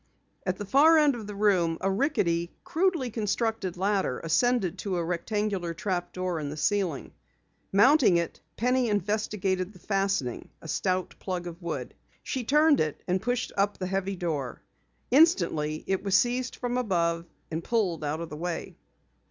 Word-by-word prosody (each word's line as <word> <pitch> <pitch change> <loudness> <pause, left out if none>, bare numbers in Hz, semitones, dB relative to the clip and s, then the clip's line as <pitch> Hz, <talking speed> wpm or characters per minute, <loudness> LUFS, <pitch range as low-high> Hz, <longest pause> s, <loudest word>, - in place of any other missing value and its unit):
At 185 0 0
the 205 - -5
far 295 +10 +6
end 300 -2 +5
of 225 -4 -7
the 205 - -6
room 185 -5 +2
a 195 - 0
rickety, 190 - 0
crudely 330 -7 0
constructed 215 -3 -1
ladder 195 -7 0
ascended 185 +2 +1
to 195 -1 -2
a 170 - -1
rectangular 180 0 -2
trap 175 -1 -2
door 185 -2 -2
in 145 -2 -4
the 150 - -6
ceiling. 180 -3 -1 0.6
Mounting 235 - +5
it, 170 -1 -3 0.2
Penny 250 +1 +2
investigated 205 -2 -1
the - - -14
fastening, 195 - -1
a - - -11
stout 185 +3 -1
plug 180 -2 -4
of 175 +1 -8
wood. 155 -7 -4 0.3
She 260 - -3
turned 300 +4 +4
it 155 -2 -1
and 185 +1 +1
pushed 245 +1 -1
up 200 +1 +1
the 185 - -3
heavy 195 +1 -1
door. 150 -8 -3 0.5
Instantly, 200 - +3
it 190 -1 0
was 195 -1 +4
seized 245 +1 0
from 245 0 -2
above 170 -6 0 0.2
and 165 +1 -3
pulled 185 -9 0
out 150 +2 -2
of 165 - -5
the - - -7
way. 170 +1 -4
195 Hz, 165 wpm, -28 LUFS, 170-225 Hz, 0.6 s, far